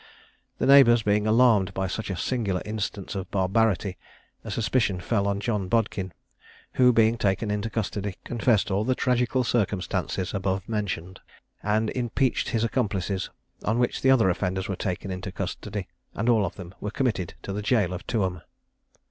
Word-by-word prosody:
The - - 0
neighbours 130 -4 +7
being 105 +1 +2
alarmed 110 -5 +4
by 95 - 0
such 105 +4 -4
a 95 - -2
singular 100 -3 -1
instance 105 -1 -4
of 95 -2 -5
barbarity, 100 0 +1 0.5
a - - -7
suspicion 110 -4 0
fell 100 +2 0
on 100 0 0
John 105 -3 -1
Bodkin; 100 -3 0 0.6
who, 125 -1 +5
being 115 0 +3
taken 100 +1 0
into 105 +2 -2
custody, 105 -3 -3
confessed 110 -3 +1
all 100 +2 +1
the 130 +3 +1
tragical 125 0 +1
circumstances 100 -5 -1
above 95 -1 -1
mentioned, 95 -4 -3 0.4
and 110 +1 +1
impeached 125 +1 0
his 115 -1 0
accomplices: 100 -5 -1 0.3
on 110 +2 +1
which 120 0 0
the 130 - +3
other 115 -8 +5
offenders 95 +1 -2
were 95 - -2
taken 95 +1 -3
into 95 +1 -5
custody, 100 +1 -5 0.3
and 115 +4 0
all 110 -5 +4
of 85 - -8
them 90 -2 -9
were 105 - -2
committed 110 -7 -1
to 100 - -4
the 105 - -3
jail 105 -4 +1
of 90 - -7
Tuam. 95 -6 -1
105 Hz, 165 wpm, -26 LUFS, 95-115 Hz, 0.6 s, neighbours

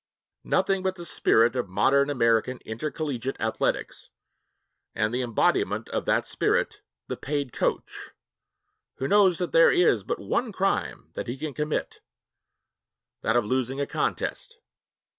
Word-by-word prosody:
Nothing 195 -1 +1
but 190 0 -1
the 175 -2 -8
spirit 115 -6 +3
of 125 -6 -2
modern 140 +9 +3
American 115 -2 +2
intercollegiate 135 +1 -4
athletics 110 0 -2 0.9
and 110 +1 0
the 125 - 0
embodiment 120 -3 +1
of - - -2
that - - +1
spirit, - - 0 0.2
the - - -4
paid 140 -3 -3
coach, - - -2 0.9
who 135 - -3
knows 195 -3 +4
that 180 - -3
there 165 - +6
is 145 - +3
but - - -3
one 220 - -1
crime 190 - -2
that - - -5
he 120 +3 -4
can 150 +1 -5
commit 150 +2 -3 1.2
that 115 - +1
of 120 -3 +3
losing 130 +3 -1
a 140 - 0
contest. 465 - -3
135 Hz, 140 wpm, -26 LUFS, 115-165 Hz, 1.2 s, there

